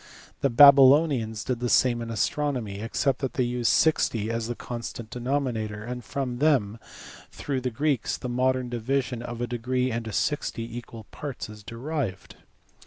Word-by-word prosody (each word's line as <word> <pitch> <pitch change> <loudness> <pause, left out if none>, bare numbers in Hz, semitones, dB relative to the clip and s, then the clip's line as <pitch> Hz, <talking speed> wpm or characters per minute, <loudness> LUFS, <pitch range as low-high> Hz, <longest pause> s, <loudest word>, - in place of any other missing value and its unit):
The 140 - +2
Babylonians 135 -3 +6
did 125 -3 -2
the 120 0 -1
same 120 -1 +3
in 115 - -5
astronomy, 120 -3 -1
except 120 +4 -1
that 135 -2 -3
they 130 - +2
used 120 -1 +1
sixty 115 -8 +2
as 115 -1 -2
the 120 - -3
constant 115 -2 -7
denominator; 120 -5 -2
and 125 +1 -6
from 125 +2 -4
them 125 -8 +2 0.5
through 135 -3 -4
the 125 - -1
Greeks 140 +1 -1
the - - -6
modern 130 +1 0
division 125 +1 -2
of 120 0 -6
a - - +1
degree 125 +2 -1
into 115 -1 -4
sixty 115 -2 -2
equal 115 -2 -8
parts 140 -7 -6
is 105 0 -11
derived. 115 -3 -5
120 Hz, 160 wpm, -26 LUFS, 115-135 Hz, 0.5 s, Babylonians